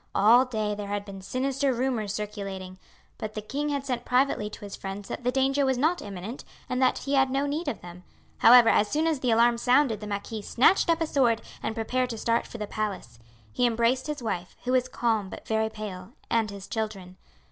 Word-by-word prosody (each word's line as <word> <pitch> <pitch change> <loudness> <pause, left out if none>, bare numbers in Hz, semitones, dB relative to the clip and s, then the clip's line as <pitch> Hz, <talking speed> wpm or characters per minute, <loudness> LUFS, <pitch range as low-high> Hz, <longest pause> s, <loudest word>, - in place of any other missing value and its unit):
All 230 +6 +6
day 215 -4 -2
there 205 0 -5
had 205 0 -3
been 195 -1 -9
sinister 270 +6 0
rumours 240 -4 -1
circulating, 195 -3 -6 0.4
but 215 0 -5
the - - -2
king 285 +7 -2
had 280 -1 -2
sent 245 -3 -2
privately 250 -4 +1
to - - -11
his 200 -1 -7
friends 195 +1 -7
that - - -5
the 250 - +1
danger 270 +2 +2
was 265 -2 +1
not 320 +7 +1
imminent 200 +5 -7 0.2
and 255 +1 -1
that 255 - +3
he 280 - -3
had 270 -1 +4
no 275 +2 0
need 300 +4 -3
of 285 - -3
them; 175 +1 -11 0.4
however, 240 0 +8
as 210 - +4
soon 305 +8 0
as 320 -4 +1
the 255 - -1
alarm 235 +1 +4
sounded 250 -2 +3
the 210 - -7
marquis 205 +2 -4
snatched 265 - +3
up 330 0 +2
a - - +3
sword 245 -7 +2 0.2
and 220 - -3
prepared 250 +3 -1
to 230 - -4
start 230 +2 0
for - - -9
the 210 - -3
palace. 200 - -4 0.3
He 245 - +2
embraced 235 +3 +1
his 295 -4 -4
wife, 180 -5 -4
who 250 - -1
was 255 -1 +2
calm 225 -6 0
but - - -10
very 220 0 +1
pale, 205 -2 -8 0.2
and 225 -2 +2
his 200 -1 -8
children. 195 -5 -4
230 Hz, 220 wpm, -27 LUFS, 205-260 Hz, 0.4 s, however